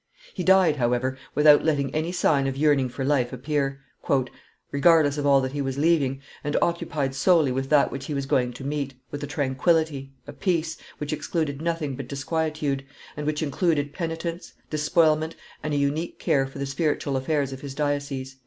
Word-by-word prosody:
He - - -3
died, 185 -5 +5
however, 125 +1 0 0.2
without 150 0 +6
letting 140 -4 0
any 155 +3 -1
sign 145 -6 +2
of 135 0 -3
yearning 145 -3 +3
for 130 +2 -4
life 130 -4 +1
appear, 135 +1 -2 0.9
"regardless 145 0 +4
of 145 - 0
all 140 -1 +5
that 130 0 -2
he 145 +1 -3
was 135 -1 -3
leaving, 140 -4 +2 0.2
and 145 - 0
occupied 150 -5 -1
solely 155 -1 +3
with 135 +1 -2
that 150 -2 +4
which 135 0 -5
he 150 - -3
was 140 -1 -2
going 125 -2 +1
to 130 - -9
meet, 140 -1 -3 0.2
with 145 0 -5
a - - -3
tranquillity, 145 0 0
a - - -9
peace, 165 -4 -1 0.2
which 150 0 -3
excluded 155 -2 -2
nothing 165 -4 -2
but 130 -1 -7
disquietude, 145 0 -2 0.3
and 150 0 -4
which 155 +1 0
included 145 -1 0
penitence, 170 0 -4 0.2
despoilment, 155 +1 +2 0.3
and 155 - -3
a - - +1
unique 145 +4 -1
care 135 -1 +1
for 135 - -11
the 140 - -2
spiritual 140 0 -1
affairs 135 0 0
of 135 - -9
his 140 -2 -7
diocese." 140 -2 -2
145 Hz, 180 wpm, -25 LUFS, 135-155 Hz, 0.9 s, without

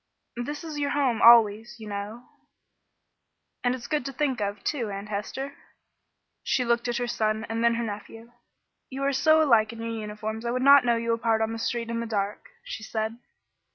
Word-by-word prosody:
"This 290 +6 -4
is 310 -3 -6
your 285 -1 0
home 270 -6 +1
always, 230 0 +6
you 220 - -9
know." 205 +3 -6 1.4
"And 245 0 +2
it's 245 -2 -9
good 300 -4 -1
to 275 - -3
think 265 -4 -1
of, 200 0 -3
too, 245 -8 -2
Aunt 200 +1 -6
Hester." 260 +7 -4 0.9
She 250 - 0
looked 235 +1 +1
at 240 - -1
her 245 - -1
son 220 -2 -1
and 225 +1 -2
then 235 0 +4
her 235 - -2
nephew. 225 +2 -8 0.6
"You 270 +1 -5
are 280 0 +1
so 315 +4 +4
like 220 -3 +4
in 230 - -10
your 230 0 -4
uniforms 220 0 -5
I 235 - -2
would 255 +1 -1
not 280 -1 +7
know 240 -1 +3
you 230 0 0
apart 230 -1 +1
on 220 0 -1
the 225 - -5
street 230 0 -2
in 230 - -2
the 235 - -3
dark," 205 -2 -3
she - - -7
said. 220 +1 -3
230 Hz, 200 wpm, -26 LUFS, 220-250 Hz, 1.4 s, not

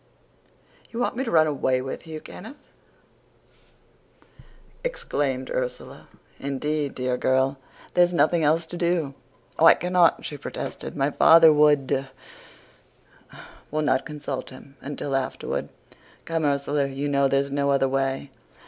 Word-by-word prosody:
"'You 230 - -6
want 245 - -1
me 260 - -1
to 245 - -4
run 160 -2 +5
away 130 -4 0
with 135 +5 -6
you, 155 -1 -7
Kenneth?' 250 +7 -10 2.3
exclaimed 145 - -2
Ursula. 125 -1 -5 0.3
"'Indeed, 145 +1 -2
dear 125 -1 -1
girl, 130 +2 +1 0.3
there's 175 0 +4
nothing 165 0 +2
else 160 +3 +2
to 175 +2 -8
do!' 170 -5 0 0.5
"'Oh, 165 - +5
I - - +9
cannot!' 180 -1 +2
she 145 - -5
protested. - - -6
'My 135 +2 0
father 160 +2 +7
would 145 -3 +3 0.6
' - - -20
"'We'll 155 +1 -1
not 145 - +1
consult 145 -3 -5
him 135 +1 -14
until 140 -1 -4
afterward. 135 -1 -3 0.6
Come, 165 -1 -1
Ursula, 140 0 0
you 140 +1 -4
know 140 -1 +2
there's 140 +1 0
no 140 0 0
other 135 -1 +3
way. 135 +1 -2
145 Hz, 135 wpm, -24 LUFS, 135-160 Hz, 2.3 s, I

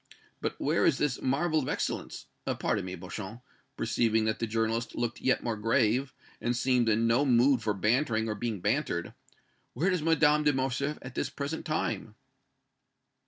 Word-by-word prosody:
But - - -3
where - - +1
is - - +3
this 145 -4 0
marvel 155 +5 +1
of 130 - -3
excellence - - -3 0.3
pardon 100 - 0
me, 95 0 -5
Beauchamp," 100 +6 -7 0.3
perceiving 110 -2 +1
that 110 0 0
the 115 - -1
journalist 115 +1 -1
looked 120 -1 -2
yet 130 - +2
more 115 -2 -1
grave, 115 +4 +1 0.3
and 120 +1 0
seemed 125 -2 +2
in 110 +1 +2
no 115 +4 +3
mood 130 -1 +4
for 105 -1 0
bantering 110 +1 +1
or 110 - -1
being 105 -2 -3
bantered 105 - -1 0.6
"where 185 +5 +1
is 180 -3 0
Madame 150 -1 +4
de 150 -1 +3
Morcerf 135 +3 -1
at 130 - -8
the - - -2
present 145 +4 -4
time?" 115 -8 -2
120 Hz, 165 wpm, -29 LUFS, 110-140 Hz, 0.6 s, mood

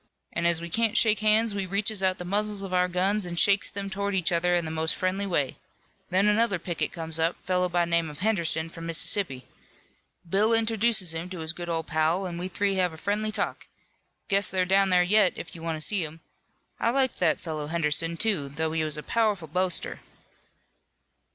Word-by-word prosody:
An' 170 - 0
as 170 -1 +2
we 170 - -5
can't 230 +3 +2
shake 215 -2 +4
hands 215 0 +3
we 195 -2 -3
reaches 200 +2 +1
out 185 -1 +1
the 180 - -7
muzzles 205 +1 -2
of 190 -1 -6
our 180 0 +3
guns 190 +4 0
and 175 0 -6
shakes 200 +1 +3
them 200 0 -5
towards 200 +1 -3
each 180 0 0
other 175 +1 +2
in 170 -1 0
the 155 - -4
most 160 0 0
friendly 190 +2 -1
way. 145 -8 -1 0.5
Then 190 +3 +2
another 210 -1 +2
picket 170 0 -3
comes 165 -1 -3
up, 165 +2 0
fellow 180 0 -1
by 175 0 +1
name 170 -1 0
of 150 - -10
Henderson, 170 -6 +1
from 165 0 -9
Mississippi. 165 -4 +1 0.8
Bill 210 +6 +3
introduces 220 -5 +2
him 165 +2 -5
to 180 -3 -7
his 160 +1 -1
good 175 0 -7
old 165 -1 -2
pal, 160 +4 0
an' 175 -2 -5
we 180 - -3
three 195 +1 -1
have 180 -3 +1
a - - -10
friendly 210 +5 -1
talk. 210 -1 -2 0.6
Guess 200 -1 +3
they're 185 -1 0
down 195 +1 +3
there 180 -1 +4
yet, 200 +1 +3
if - - -8
you 165 - -10
want 165 -1 -3
to 155 - -2
see 200 -4 +2
'em. 160 +1 -8 0.6
I - - +1
liked 260 0 0
that - - +2
fellow, 155 -3 -5
Henderson, 165 +1 0
too, 185 -11 0
though 160 +3 -3
he 160 0 -1
was 155 -1 0
a 150 - -6
powerful 210 -7 0
boaster." 180 +3 0
180 Hz, 210 wpm, -26 LUFS, 165-200 Hz, 0.8 s, shake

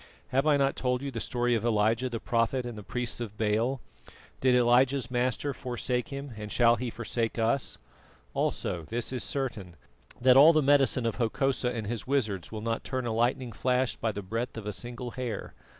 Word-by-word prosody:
Have 135 +4 +1
I 150 -2 +5
not 140 0 +2
told 125 0 -1
you 140 - -3
the 115 - -4
story 120 +1 0
of 115 - 0
Elijah 115 +2 +2
the 115 -2 -4
prophet 120 +3 0
and 120 -2 -5
the 105 - -7
priests 120 +3 -3
of 110 -3 -6
Baal? 115 +4 +1 0.6
Did 130 -1 +4
Elijah's 125 +2 +3
Master 125 +3 0
forsake 125 0 -2
him, 140 -3 -6
and 105 -1 -6
shall 120 -1 +5
He 125 +2 -3
forsake 115 0 -3
us? 115 +4 0 0.6
Also 85 - -1
this 115 +9 -4
is 125 - -2
certain, 110 -11 -3 0.4
that 125 +1 +6
all 150 +5 +9
the 155 -1 +3
medicine 135 -3 +3
of 115 - -1
Hokosa 125 +2 0
and 115 -3 -4
his 115 +2 -4
wizards 110 - -1
will 110 -1 -5
not 115 +1 -2
turn 130 -2 -3
a 115 - -1
lightning 120 +2 0
flash 125 +3 0
by 110 - -1
the 100 -1 -6
breadth 115 +5 -3
of 110 - -6
a 105 - -3
single 120 +3 -6
hair. 125 -4 -5
120 Hz, 200 wpm, -29 LUFS, 115-130 Hz, 0.6 s, all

